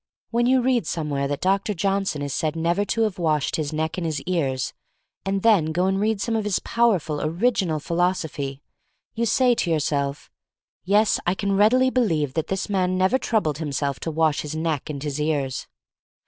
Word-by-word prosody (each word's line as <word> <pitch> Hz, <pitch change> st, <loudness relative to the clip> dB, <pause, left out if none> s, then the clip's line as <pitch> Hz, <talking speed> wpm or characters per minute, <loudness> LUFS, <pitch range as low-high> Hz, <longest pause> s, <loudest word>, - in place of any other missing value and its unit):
When 240 Hz, +1 st, +2 dB
you 255 Hz, -1 st, +3 dB
read 245 Hz, -8 st, +1 dB
somewhere 145 Hz, -4 st, -1 dB
that 145 Hz, 0 st, -3 dB
Dr. 195 Hz, +2 st, +1 dB
Johnson 195 Hz, -4 st, -1 dB
is 140 Hz, -1 st, -3 dB
said 155 Hz, +1 st, -1 dB
never 170 Hz, +4 st, +1 dB
to 230 Hz, +2 st, -1 dB
have 210 Hz, -4 st, -2 dB
washed 155 Hz, -4 st, +1 dB
his 150 Hz, -2 st, -2 dB
neck 160 Hz, +1 st, -2 dB
and 170 Hz, -, -3 dB
his 155 Hz, -2 st, -2 dB
ears, 140 Hz, -8 st, -1 dB, 0.5 s
and 195 Hz, 0 st, -1 dB
then 215 Hz, -8 st, +5 dB
go 175 Hz, +3 st, +1 dB
and 190 Hz, 0 st, +1 dB
read 215 Hz, 0 st, +1 dB
some 225 Hz, +3 st, -1 dB
of 220 Hz, -, 0 dB
his 205 Hz, -3 st, 0 dB
powerful, 190 Hz, -11 st, +1 dB
original 175 Hz, -1 st, 0 dB
philosophy, 160 Hz, -5 st, -2 dB, 0.5 s
you 235 Hz, +1 st, -1 dB
say 250 Hz, +2 st, +4 dB
to 200 Hz, -, -1 dB
yourself, 145 Hz, -3 st, -1 dB, 0.5 s
"Yes, 205 Hz, +3 st, +3 dB
I 175 Hz, -, +2 dB
can 200 Hz, 0 st, -1 dB
readily 250 Hz, +6 st, +4 dB
believe 160 Hz, -, +1 dB
that 160 Hz, -, -2 dB
this 190 Hz, 0 st, -2 dB
man 185 Hz, -3 st, 0 dB
never 190 Hz, +8 st, +3 dB
troubled 160 Hz, -, 0 dB
himself 140 Hz, -4 st, -2 dB
to -, -, -4 dB
wash 160 Hz, -1 st, +1 dB
his 150 Hz, +1 st, -5 dB
neck 160 Hz, -3 st, -2 dB
and 140 Hz, -2 st, -5 dB
his 150 Hz, 0 st, -3 dB
ears." 145 Hz, -4 st, -1 dB
170 Hz, 190 wpm, -23 LUFS, 150-205 Hz, 0.5 s, then